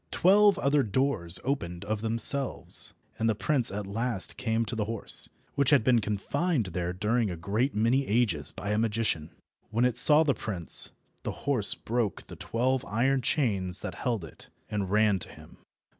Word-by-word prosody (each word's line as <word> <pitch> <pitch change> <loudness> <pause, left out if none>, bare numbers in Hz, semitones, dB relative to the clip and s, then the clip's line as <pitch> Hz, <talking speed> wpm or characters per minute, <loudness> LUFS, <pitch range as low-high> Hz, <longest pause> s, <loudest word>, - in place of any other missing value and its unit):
Twelve 200 +1 +4
other 140 +1 +2
doors 105 -7 0
opened 100 -10 -3
of 105 0 -3
themselves, 115 +5 0 0.2
and 115 - +1
the 110 - +1
prince 130 +1 +3
at 100 +1 -5
last 110 +1 -3
came 115 -2 -1
to 115 - -5
the 110 -2 -2
horse, 115 0 0 0.2
which 140 -2 +2
had 145 -6 +4
been 120 -1 +3
confined 115 - -1
there 90 0 -2
during 105 +4 -1
a 90 - -5
great 105 +10 -1
many 120 +6 +1
ages 100 - +1
by 105 - -5
a 105 - +1
magician. 110 -8 0 0.4
When 115 +3 +1
it 125 -1 +1
saw 150 +3 +6
the 145 -3 +1
prince, 95 -7 +4 0.3
the - - -7
horse 130 -8 +1
broke 115 -4 -3
the - - -11
twelve 130 +3 -1
iron 130 +5 0
chains 105 - 0
that - - -5
held 115 -8 -3
it, - - -13 0.2
and 100 -3 -2
ran 105 -1 +2
to - - -4
him. - - -15
115 Hz, 175 wpm, -28 LUFS, 100-130 Hz, 0.4 s, saw